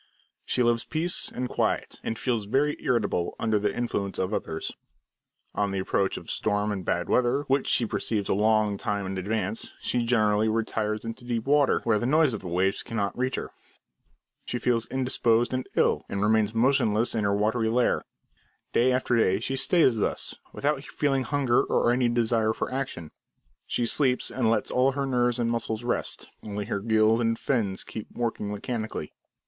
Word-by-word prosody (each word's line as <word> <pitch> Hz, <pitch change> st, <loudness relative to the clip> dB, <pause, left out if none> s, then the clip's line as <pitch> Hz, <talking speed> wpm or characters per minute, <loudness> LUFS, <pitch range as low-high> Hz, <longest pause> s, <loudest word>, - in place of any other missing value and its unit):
She 125 Hz, -, +1 dB
loves 120 Hz, -1 st, +2 dB
peace 165 Hz, +3 st, -1 dB
and 125 Hz, +1 st, -3 dB
quiet, -, -, -1 dB
and 115 Hz, -, -3 dB
feels 115 Hz, -5 st, -1 dB
very 140 Hz, +7 st, +1 dB
irritable 105 Hz, -8 st, 0 dB
under 110 Hz, -2 st, +1 dB
the 105 Hz, 0 st, 0 dB
influence 100 Hz, -4 st, -2 dB
of 95 Hz, +3 st, -1 dB
others. 80 Hz, -5 st, -3 dB, 0.8 s
On 100 Hz, -1 st, 0 dB
the 100 Hz, -, -3 dB
approach 95 Hz, +1 st, 0 dB
of -, -, -10 dB
storm 105 Hz, 0 st, 0 dB
and 95 Hz, -2 st, -3 dB
bad 90 Hz, +1 st, -1 dB
weather, 125 Hz, +3 st, +2 dB
which 135 Hz, -1 st, 0 dB
she 120 Hz, -, +3 dB
perceives 105 Hz, -1 st, -1 dB
a -, -, +2 dB
long 105 Hz, 0 st, +2 dB
time 100 Hz, -1 st, -2 dB
in 95 Hz, 0 st, -3 dB
advance, 105 Hz, +1 st, -2 dB
she 120 Hz, -, 0 dB
generally 110 Hz, -2 st, +2 dB
retires 110 Hz, -1 st, -1 dB
into 115 Hz, +2 st, -6 dB
deep 120 Hz, -2 st, -2 dB
water, 145 Hz, 0 st, +3 dB
where 110 Hz, -3 st, +2 dB
the 120 Hz, -, -1 dB
noise 150 Hz, -1 st, +4 dB
of 110 Hz, -, -3 dB
the 95 Hz, -, -8 dB
waves 95 Hz, +3 st, +1 dB
cannot 105 Hz, -3 st, -3 dB
reach 130 Hz, +1 st, -1 dB
her. -, -, -5 dB, 0.9 s
She 125 Hz, -, -3 dB
feels 120 Hz, -2 st, 0 dB
indisposed 120 Hz, -2 st, +1 dB
and 130 Hz, 0 st, -3 dB
ill, -, -, +3 dB
and 100 Hz, 0 st, -1 dB
remains 110 Hz, 0 st, +2 dB
motionless 115 Hz, -2 st, +2 dB
in 110 Hz, -, 0 dB
her 100 Hz, 0 st, +2 dB
watery 110 Hz, +2 st, +1 dB
lair. 120 Hz, +2 st, +2 dB, 0.7 s
Day 125 Hz, +2 st, +4 dB
after 125 Hz, -1 st, +1 dB
day 95 Hz, -4 st, +3 dB
she 130 Hz, +4 st, -2 dB
stays 135 Hz, -4 st, +3 dB
thus, 105 Hz, -, -2 dB, 0.2 s
without 145 Hz, -1 st, -1 dB
feeling 135 Hz, -3 st, 0 dB
hunger, 135 Hz, -4 st, +2 dB
or 120 Hz, -, +2 dB
any 125 Hz, 0 st, +2 dB
desire 115 Hz, -2 st, +1 dB
for -, -, -4 dB
action. 125 Hz, -, -4 dB, 0.6 s
She 120 Hz, -, 0 dB
sleeps 125 Hz, +1 st, +1 dB
and 120 Hz, -4 st, +1 dB
lets 115 Hz, -, 0 dB
all 130 Hz, +2 st, +3 dB
her 140 Hz, 0 st, -1 dB
nerves 125 Hz, -2 st, +1 dB
and 120 Hz, -1 st, 0 dB
muscles 115 Hz, -1 st, -2 dB
rest; 120 Hz, -, -3 dB, 0.2 s
only 105 Hz, 0 st, -4 dB
her 100 Hz, -2 st, -2 dB
gills 110 Hz, +1 st, +3 dB
and 115 Hz, -1 st, +1 dB
fins 105 Hz, -9 st, -1 dB
keep 110 Hz, -, -8 dB
working 115 Hz, -3 st, -3 dB
mechanically. 110 Hz, -, -4 dB
115 Hz, 180 wpm, -26 LUFS, 105-125 Hz, 0.9 s, noise